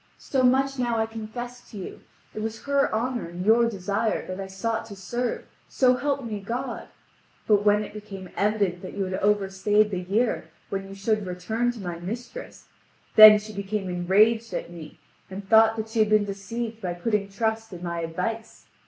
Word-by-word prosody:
So 265 - -1
much 265 +2 +2
now 240 -2 0
I 220 - +2
confess 240 +2 -8
to 215 - -10
you: 190 - -8 0.3
it 215 - -5
was 220 0 -5
her 280 0 +2
honour 240 -1 -1
and 175 +2 -6
your 230 +2 +5
desire 200 +1 -1
that 185 +1 -6
I 195 - -4
sought 220 +4 -2
to 205 - -9
serve, 240 +6 -3 0.2
so 255 -1 +3
help 280 +1 -1
me 215 -3 -4
God! 240 +5 -4 0.6
But 205 -2 +3
when 210 0 +4
it 205 - -9
became 195 -3 -9
evident 200 -4 0
that 185 - -8
you 200 - 0
had 185 0 -4
overstayed 205 +1 +2
the 185 - -1
year 195 -2 -1 0.2
when 195 0 -4
you 195 - -9
should 210 0 -1
return 220 +7 -1
to 235 - -10
my 175 -3 -5
mistress, 240 - -7 0.5
then 215 -1 +11
she 215 +1 -8
became 200 -1 -3
enraged 215 +6 +2
at - - -4
me, 165 -3 -10 0.3
and 195 +1 -8
thought 225 +1 +6
that 220 0 -4
she 225 0 -2
had 215 -1 +4
been 215 -1 +4
deceived 220 +3 -5
by 175 -3 -3
putting 205 +1 -1
trust 220 +2 -2
in 180 -1 -9
my 170 -1 -3
advice. 200 +8 -4
215 Hz, 190 wpm, -25 LUFS, 195-230 Hz, 0.6 s, then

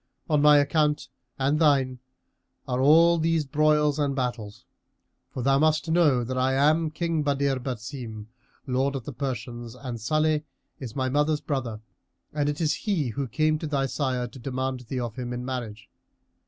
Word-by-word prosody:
On 150 -3 +2
my 150 0 +7
account 150 -1 +1 0.3
and 140 +3 +1
thine 135 -5 +3 0.7
are 125 0 -1
all 165 +4 +6
these 165 -1 +1
broils 150 +1 +2
and 140 -2 0
battles; 120 -3 -4 0.6
for 125 - -5
thou 135 +1 +3
must 155 +1 +2
know 150 -8 +3
that 130 +2 -3
I 130 +1 +2
am 155 +4 +3
King 165 0 -1
Badr 140 -2 +1
Basim, 120 -3 -6 0.4
Lord 135 +1 0
of 135 - -4
the 145 - -6
Persians 120 -2 -5
and 125 -3 -7
Salih 155 +5 +1 0.4
is 125 -5 -7
my 130 -2 0
mother's 150 +3 +1
brother 130 -7 -3 0.5
and 145 -1 0
he - - +1
it 145 - -12
is 155 -2 +1 0.4
who 140 +1 -3
came 155 +5 +1
to 155 - -4
thy 140 -2 0
sire 130 -2 -1
to 130 - -12
demand 130 +1 -3
thee 130 - -2
of 120 -1 -5
him 125 -1 -4
in 125 0 -5
marriage. 115 -4 -5
135 Hz, 170 wpm, -26 LUFS, 125-150 Hz, 0.7 s, my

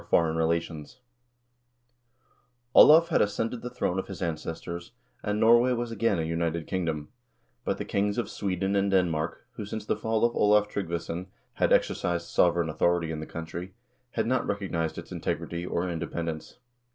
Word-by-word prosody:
Foreign 80 -1 +3
Relations 80 - -2 1.7
Olav 165 +2 +8
had 165 - +3
ascended 115 +3 -1
the 125 - -5
throne 95 -7 -1
of - - -4
his 95 -4 -7
ancestors, 85 +1 -5 0.3
and 105 0 -1
Norway 120 +3 +5
was 120 -1 -2
again 115 -3 +1
a 80 - 0
united 85 0 -1
kingdom; 80 -5 -2 0.5
but - - -1
the - - -4
kings 100 +1 0
of 120 - -1
Sweden 95 0 -2
and 100 0 +2
Denmark, 85 -4 0
who, - - -4
since 105 0 -5
the - - +1
fall 110 +1 +1
of 120 - 0
Olav 105 0 +4
Tryggvason, 85 -2 -4 0.3
had - - +1
exercised 85 -1 +1
sovereign 85 -1 +3
authority 85 +1 +1
in 80 - -4
the 80 - -6
country, 85 +3 -7 0.4
had 110 - 0
not 130 +3 0
recognized 90 -6 -2
its - - -8
integrity, 85 +1 -3
or 90 +1 -1
inde 85 -2 -3
pendence. 80 +1 -4
90 Hz, 165 wpm, -28 LUFS, 85-105 Hz, 1.7 s, Olav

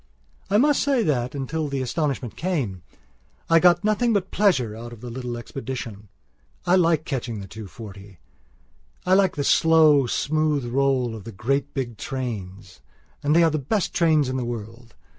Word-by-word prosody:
I 205 - +3
must 290 +4 +3
say 270 -4 +2
that, 125 -4 -1
until 150 +3 -2
the 140 -1 -3
astonishment 140 -3 -2
came, 140 - -2 0.7
I 165 - +7
got 175 0 +4
nothing 215 +3 +2
but 195 -2 -1
pleasure 135 - +2
out 120 +1 -8
of 115 - -13
the 120 -1 -7
little 125 -1 -5
expedition. 120 -5 -7 0.6
I 180 0 +4
like 165 -4 +3
catching 120 -6 -3
the 100 - -7
two 110 +1 -9
forty; 100 -2 -11 0.9
I 185 - +3
like 190 -2 +3
the 145 - -1
slow, 155 -4 +5
smooth 150 0 0
roll 130 -1 +1
of 110 -3 -8
the 115 - -8
great 135 +8 -2
big 120 -5 -4
trainsand 105 - -5
they 170 - +6
are 165 - +4
the 155 - -1
best 180 +9 -1
trains 155 -4 +3
in 130 0 -2
the 130 - -2
world! 115 0 -7
135 Hz, 170 wpm, -24 LUFS, 120-160 Hz, 0.9 s, I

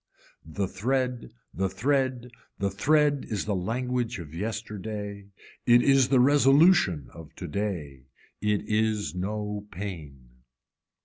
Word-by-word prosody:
The 95 +5 -3
thread, 125 - -1 0.2
the 95 +6 -1
thread, 125 +4 0 0.3
the 100 0 -1
thread 145 +7 +2
is 105 -3 -2
the 105 - -1
language 120 +5 -2
of 80 -4 -9
yesterday, 105 0 -5 0.4
it 120 0 +6
is 135 -2 +4
the 130 - +4
resolution 135 - +5
of 80 -1 -12
today, 80 -8 -4 0.3
it 105 -1 +1
is 110 -2 0
no 105 +2 -4
pain. 70 -10 -8
105 Hz, 115 wpm, -27 LUFS, 95-125 Hz, 0.4 s, it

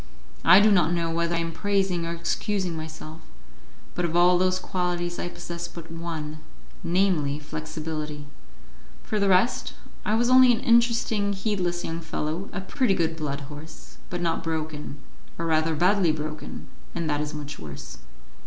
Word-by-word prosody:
I 185 - +9
do 215 +1 +6
not 175 -4 +4
know 170 -1 0
whether 170 +1 0
I - - +1
am 165 0 -1
praising 190 -2 0
or - - -2
excusing 175 +2 -1
myself, 155 0 -7 0.7
but 180 - -2
of 170 -1 -1
all 175 +1 +6
those 185 0 +3
qualities 175 -2 -2
I 175 - -2
possessed 170 -1 -7
but 165 -1 -8
one 160 -2 -5 0.4
namely, 170 -6 +2
flexibility; 155 0 -5 0.8
for 215 - -1
the 200 -1 +3
rest, 190 +6 +3 0.3
I 215 - +1
was 240 +2 +3
only 255 0 +8
an 230 - +2
interesting, 230 -4 +3
heedless 190 -4 -1
young 165 +1 -3
fellow, 160 +3 -3
a 195 - -4
pretty 215 +1 +1
good 165 -2 0
blood 145 -3 -3
horse, 150 +3 -11
but 175 0 -3
not 165 -1 0
broken, 155 -3 -3 0.4
or 165 - -2
rather 160 0 +2
badly 180 +1 +4
broken; 155 0 -5 0.3
and 170 -2 -2
that 150 -1 0
is 150 0 -4
much 145 -1 -7
worse. 75 -3 -8
170 Hz, 160 wpm, -26 LUFS, 155-190 Hz, 0.8 s, I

